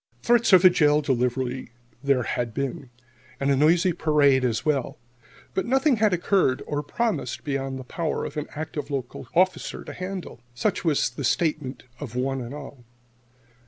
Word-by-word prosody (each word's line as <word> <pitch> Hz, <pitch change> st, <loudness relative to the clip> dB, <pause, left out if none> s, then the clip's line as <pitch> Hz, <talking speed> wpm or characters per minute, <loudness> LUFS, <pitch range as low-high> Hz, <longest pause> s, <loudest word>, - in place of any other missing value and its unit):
Threats 240 Hz, -1 st, +3 dB
of 185 Hz, -1 st, +7 dB
a -, -, +11 dB
jail 150 Hz, -3 st, +4 dB
delivery 125 Hz, -1 st, -1 dB, 0.3 s
there 140 Hz, -3 st, +2 dB
had 120 Hz, -3 st, -3 dB
been, 135 Hz, -1 st, -3 dB, 0.5 s
and 140 Hz, 0 st, +1 dB
a -, -, +4 dB
noisy 170 Hz, +5 st, +4 dB
parade 145 Hz, -4 st, +3 dB
as 115 Hz, -3 st, 0 dB
well, 140 Hz, -5 st, 0 dB, 0.6 s
but 190 Hz, -, -1 dB
nothing 265 Hz, +1 st, +3 dB
had 215 Hz, -1 st, +3 dB
occurred 180 Hz, -6 st, +2 dB
or 145 Hz, -1 st, -2 dB
promised 225 Hz, +9 st, -2 dB
beyond 135 Hz, -2 st, -2 dB
the 130 Hz, -, -7 dB
power 155 Hz, +5 st, -3 dB
of -, -, -7 dB
an 150 Hz, 0 st, -3 dB
active 150 Hz, -2 st, -5 dB
local 130 Hz, -2 st, -5 dB
officer 185 Hz, +2 st, +1 dB
to -, -, -8 dB
handle. 185 Hz, -8 st, -6 dB
Such 205 Hz, -, -1 dB
was 150 Hz, -7 st, +1 dB
the 140 Hz, +3 st, -6 dB
statement 145 Hz, 0 st, -1 dB, 0.2 s
of 125 Hz, -5 st, -7 dB
one 135 Hz, +1 st, -1 dB
and 120 Hz, 0 st, -7 dB
all. 140 Hz, -3 st, -10 dB
145 Hz, 165 wpm, -25 LUFS, 130-175 Hz, 0.6 s, a